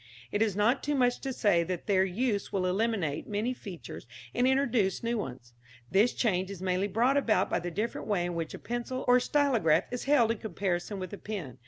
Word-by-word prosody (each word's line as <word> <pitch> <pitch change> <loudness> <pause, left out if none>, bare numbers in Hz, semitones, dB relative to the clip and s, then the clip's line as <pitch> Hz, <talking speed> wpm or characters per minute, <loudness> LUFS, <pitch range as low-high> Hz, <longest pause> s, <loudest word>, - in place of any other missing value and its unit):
It 205 - 0
is 215 -4 +2
not 225 +6 +2
too 295 0 -1
much 245 -2 +2
to 270 - -4
say 200 -8 +2
that 175 0 -4
their 195 -3 +3
use 205 +2 -1
will 190 -2 0
eliminate 185 -6 0
many 215 +5 -1
features 195 -8 -9 0.3
and 245 +1 +2
introduce 250 -8 +1
new 235 0 0
ones. 125 -8 -7 0.4
This 210 +5 +4
change 190 -5 0
is 200 -3 -7
mainly 185 +1 0
brought 240 +7 +2
about 215 -9 +2
by - - +2
the 175 - -4
different 210 +7 -3
way 195 -5 +1
in 175 - -3
which 165 -2 -4
a - - -7
pencil 240 +2 -4
or 250 0 +6
stylograph 235 - +2
is 245 - -4
held 265 -5 +4
in 230 - -3
comparison 195 -1 -2
with 185 -1 -6
a 205 - -6
pen. 185 - -6
205 Hz, 210 wpm, -29 LUFS, 185-240 Hz, 0.4 s, or